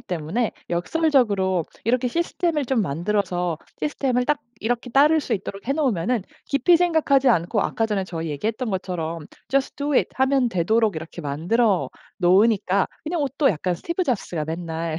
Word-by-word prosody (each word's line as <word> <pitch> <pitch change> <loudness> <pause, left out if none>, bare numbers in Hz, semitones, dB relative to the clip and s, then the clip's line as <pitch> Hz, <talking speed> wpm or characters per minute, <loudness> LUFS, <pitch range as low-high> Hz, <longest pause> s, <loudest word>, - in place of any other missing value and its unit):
때문에 180 +7 -2 0.2
역설적으로 200 - +1 0.2
이렇게 250 +2 +1
시스템을 335 +1 -1
좀 250 -3 +1
만들어서 180 +1 -1 0.2
시스템을 260 -4 0
딱 295 +2 +1 0.2
이렇게 245 +2 -2
따를 300 +5 +5
수 255 - -4
있도록 195 +2 -6
해 275 - +3
놓으면은 245 - 0 0.2
깊이 335 +5 +4
생각하지 320 -6 +3
않고 190 -1 +2
아까 225 - 0
전에 210 -3 -1
저희 165 -3 -5
얘기했던 220 - -2
것처럼 170 -4 -4 0.2
"Just 275 0 0
do 290 +1 -2
it." - - +3
하면 265 -1 +2
되도록 215 +2 +1
이렇게 160 +2 -7
만들어 180 +9 +1 0.3
놓으니까 195 +1 +3 0.2
그냥 320 0 -1
옷도 275 +1 +1
약간 180 0 -1
스티브 340 - -2
잡스가 195 - -2
맨날 165 0 -4
220 Hz, 390 characters per minute, -23 LUFS, 175-270 Hz, 0.3 s, 따를